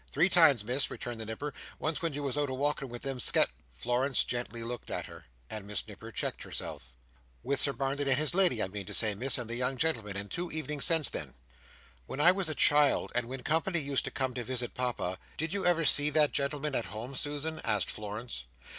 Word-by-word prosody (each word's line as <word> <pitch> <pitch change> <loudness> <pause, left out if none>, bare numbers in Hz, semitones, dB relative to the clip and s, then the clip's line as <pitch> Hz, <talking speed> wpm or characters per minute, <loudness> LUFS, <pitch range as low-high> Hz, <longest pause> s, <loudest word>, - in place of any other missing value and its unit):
"Three 180 - +4
times, 155 - +6
Miss," 125 +5 +1
returned 120 -2 -6
the 110 - -5
Nipper. 140 +7 -5 0.2
"Once 155 0 -2
when 165 -1 0
you 145 +1 -4
was 140 -2 -2
out 145 -1 0
a 130 - -3
walking 140 0 -1
with 120 0 -8
them 135 -2 -3
Sket—" - - +5 0.3
Florence 125 - +1
gently 120 -1 -4
looked 120 0 -6
at - - -3
her, - - -13 0.2
and 105 -2 -7
Miss 105 -1 -1
Nipper - - -10
checked - - -3
herself. - - -4 0.5
"With 140 +1 -1
Sir 140 - +4
Barnet 140 +1 -2
and 135 -1 +3
his 155 +1 +2
lady, 175 - +3
I - - 0
mean 100 -1 -7
to - - -1
say, 110 -2 +5
Miss, 125 +7 +3
and 120 -2 -3
the 115 - -5
young 125 +2 0
gentleman. 115 -10 0
And 100 +1 -6
two 175 0 -3
evenings 150 -2 0
since 160 -6 +5
then." 70 -4 -6 0.7
"When 135 - -6
I 170 +4 +7
was 185 -3 -1
a 155 - -1
child, 145 -1 +3
and 120 -1 +1
when 130 +1 -6
company 165 +3 +1
used 140 -3 +1
to - - -2
come 130 -2 -2
to 120 0 -4
visit 125 0 -2
Papa, 120 -8 -2 0.2
did 160 +3 -2
you 200 -2 +1
ever 165 -2 +3
see 145 0 +6
that 150 -1 +3
gentleman 140 +1 -2
at 120 - -1
home, 115 +6 -7
Susan?" 150 +3 -2
asked 105 -4 0
Florence. 105 - -6
135 Hz, 225 wpm, -30 LUFS, 115-150 Hz, 0.7 s, I